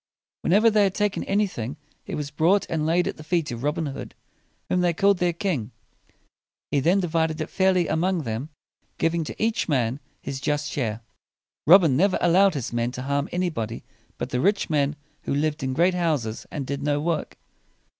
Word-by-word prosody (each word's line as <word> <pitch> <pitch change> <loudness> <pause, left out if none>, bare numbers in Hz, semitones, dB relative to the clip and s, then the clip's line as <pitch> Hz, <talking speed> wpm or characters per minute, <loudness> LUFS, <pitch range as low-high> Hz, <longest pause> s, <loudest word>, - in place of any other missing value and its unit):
When - - -1
ever 215 +4 +5
they 210 -1 +4
had 190 - -1
taken 205 -1 0
anything, 185 - -1 0.3
it - - -4
was 145 -1 -4
brought 170 +6 +3
and 155 -2 0
laid 175 +2 +2
at - - -4
the 155 - -10
feet 160 -3 0
of 120 -1 -5
Robin 150 +4 -1
Hood, 140 -2 -7 0.5
whom 180 - +1
they 175 -1 +2
called 200 +1 +3
their 175 0 +2
king. 170 - -2 1.0
He 145 - +2
then 175 +8 +3
di 175 - -1
vid 160 0 +1
ed 160 0 -5
it - - -4
fairly 185 -3 +2
among 170 +2 0
them, 115 +5 -4 0.5
giving 165 0 +1
to - - -6
each 225 -4 0
man 130 -2 +1 0.2
his 135 -1 -6
just 145 0 -1
share. 115 -5 -2 0.7
Robin 165 -5 +7
never 185 +7 +3
allowed 185 +1 +4
his 130 -4 -4
men 120 +1 0
to 130 - -5
harm 140 +1 -1
any 180 0 0
body 115 -4 -4 0.3
but - - -4
the 125 - 0
rich 200 +1 +1
men 145 -1 +1 0.3
who - - -1
lived 150 +1 0
in 130 0 -1
great 175 +5 +3
houses 150 -11 -1
and 145 -4 -4
did 140 +1 -4
no 145 0 +1
work. 165 +2 -2
160 Hz, 200 wpm, -24 LUFS, 140-180 Hz, 1.0 s, Robin